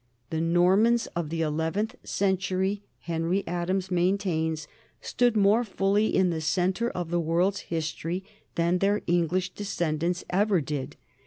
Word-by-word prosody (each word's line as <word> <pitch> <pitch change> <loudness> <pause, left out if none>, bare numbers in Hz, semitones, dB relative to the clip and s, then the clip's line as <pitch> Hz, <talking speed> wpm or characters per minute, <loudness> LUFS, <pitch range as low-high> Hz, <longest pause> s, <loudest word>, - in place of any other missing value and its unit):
The 160 0 -1
Normans 190 +8 +4
of 170 -3 -2
the 165 0 -1
eleventh 160 +7 -1
century, 190 +1 0 0.2
Henry 170 +3 -1
Adams 180 +2 -2
maintains, 175 -3 0 0.3
stood 245 -3 +1
more 210 +4 +4
fully 200 0 +1
in 185 -2 +3
the 160 -1 -2
centre 185 +8 +1
of 175 -5 -5
the 175 - +2
world's 175 +5 +1
history 165 +2 -3 0.3
than 170 +2 +2
their 200 +2 +1
English 175 +2 +1
descendants 175 -3 -2
ever 200 0 +3
did. 140 -3 -4
180 Hz, 135 wpm, -27 LUFS, 165-195 Hz, 0.3 s, Normans